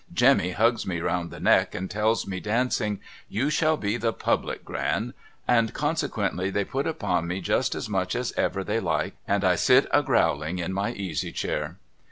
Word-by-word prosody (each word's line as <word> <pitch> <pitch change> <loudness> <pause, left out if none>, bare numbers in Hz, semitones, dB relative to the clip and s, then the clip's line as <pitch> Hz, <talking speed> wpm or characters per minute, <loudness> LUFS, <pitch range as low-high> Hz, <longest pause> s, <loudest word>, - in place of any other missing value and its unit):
' - - -25
Jemmy 90 - +5
hugs 115 +4 +2
me 85 -3 -1
round 85 +1 -1
the - - -9
neck - - +3
and 95 - -3
tells 110 +3 +1
me 95 -1 -4
dancing, 110 -1 0 0.2
' - - -22
You 140 +6 +2
shall 155 +1 +2
be 105 0 -1
the 115 -1 0
Public - - -1
Gran - - -2 0.2
' - - -35
and 115 -1 +1
consequently 140 - -1
they 100 0 0
put 135 +1 -2
upon 90 - -1
mc 90 +2 -3
just - - +1
as - - -4
much 95 -2 -1
as 125 0 -1
ever 95 - -1
they 105 +3 0
like 85 -7 -1
and 100 0 +1
I 90 -1 +4
sit 125 +9 +5
a 145 - +5
growling 85 - +1
in 90 +1 -3
my 100 +2 -1
easy 95 -7 -3
chair. 75 +4 -3
100 Hz, 205 wpm, -26 LUFS, 90-120 Hz, 0.2 s, Jemmy